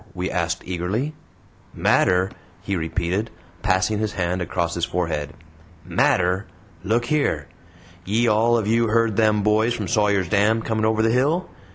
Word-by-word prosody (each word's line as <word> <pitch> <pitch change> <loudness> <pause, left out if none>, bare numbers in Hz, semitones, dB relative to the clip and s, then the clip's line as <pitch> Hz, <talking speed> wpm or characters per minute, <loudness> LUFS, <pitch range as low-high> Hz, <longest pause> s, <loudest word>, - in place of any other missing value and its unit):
we 90 +1 -3
asked 85 -1 -2
eagerly. 95 - -2 0.6
"Matter!" 90 +1 +2 0.3
he 100 - -2
repeated, 90 +5 -2 0.3
passing 100 +2 +1
his 110 -1 -2
hand 90 0 -1
across 85 -1 -2
his 85 - -4
forehead. 80 -5 -2 0.5
"Matter! 90 +4 +1 0.4
Look 120 +5 0
yere! 150 -1 0 0.6
Ye 110 +5 +1
all 115 +2 +3
of 110 - -1
you 115 +2 +2
heard 115 -1 +2
them 105 -1 +2
boys 110 +3 +2
from - - -4
Sawyer's 105 -4 +1
Dam 105 +4 +2
coming 110 -1 -1
over 110 0 +2
the 115 - +3
hill? 145 +9 +1
105 Hz, 150 wpm, -22 LUFS, 90-115 Hz, 0.6 s, all